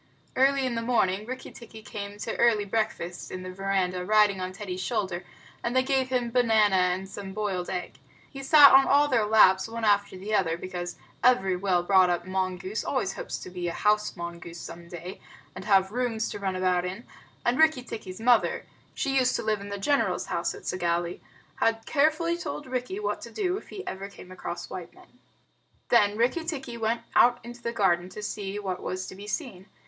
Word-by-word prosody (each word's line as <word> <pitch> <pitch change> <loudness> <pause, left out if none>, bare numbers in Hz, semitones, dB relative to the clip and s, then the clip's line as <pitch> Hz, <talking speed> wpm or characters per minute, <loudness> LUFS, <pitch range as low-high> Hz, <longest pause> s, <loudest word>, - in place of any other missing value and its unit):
Early 270 +1 +3
in 255 - -1
the 230 - -2
morning 215 -4 +1
Rikki 255 +1 -6
tikki 225 -2 -12
came 205 -2 -7
to - - -4
early 225 -3 +3
breakfast 200 -4 -2
in 185 0 -6
the 185 - -6
veranda 185 -1 -1
riding 210 -1 +3
on 185 0 -3
Teddy's 185 -1 -6
shoulder, 190 -5 -2 0.4
and 235 +2 -2
they 260 - +4
gave 265 -1 +1
him 245 -2 0
banana 220 -5 +4
and 185 +1 +1
some 195 0 -8
boiled 195 -4 -2
egg. 180 - -5 0.3
He 275 - -9
sat 285 +1 +8
on 270 0 +7
all 290 +1 +5
their 235 -6 +2
laps 190 -3 +5
one 230 0 -6
after 205 -2 +2
the 205 +4 -5
other, 170 -5 +2
because 175 -1 -5 0.3
every 195 -7 +4
well 180 -1 +1
brought 185 0 +5
up 175 0 -1
mongoose 185 +1 -2
always 245 -8 -1
hopes - - -5
to 185 - -8
be 180 -1 -4
a 170 - -2
house 210 0 +1
mongoose 170 -1 -7
some 170 0 -9
day 175 +2 -8 0.3
and - - -8
have 195 -2 +3
rooms 230 -2 -1
to 205 - -6
run 190 -2 -2
about 185 -1 +1
in; 190 +6 -5 0.4
and 240 +3 +2
Rikki 315 -5 +4
tikki's 185 -6 -8
mother 235 0 +3 0.3
(she 270 - -1
used 255 -1 +2
to - - -2
live 215 -2 0
in 200 - -8
the 200 - -4
general's 285 +9 +1
house - - -1
at - - -12
Segowlee) 175 -1 -1 0.4
had 225 0 +1
carefully 315 +3 +2
told 295 - -5
Rikki 255 +9 -3
what 425 - -2
to - - -8
do 375 -4 -1
if - - -12
ever 195 +1 -5
he - - -16
came 185 - -12
across 175 -1 -6
white 180 -2 -8
men. 250 - -20 0.7
Then 210 -3 +4
Rikki 250 +8 +1
tikki 275 -7 -5
went 230 0 -1
out 240 0 +6
into 240 0 -10
the 235 - -2
garden 185 -5 +1
to 210 - -8
see 205 -1 -4
what 190 -3 -4
was 185 0 -4
to - - -8
be 200 +2 -10
seen. 210 - -5
205 Hz, 205 wpm, -27 LUFS, 185-240 Hz, 0.7 s, sat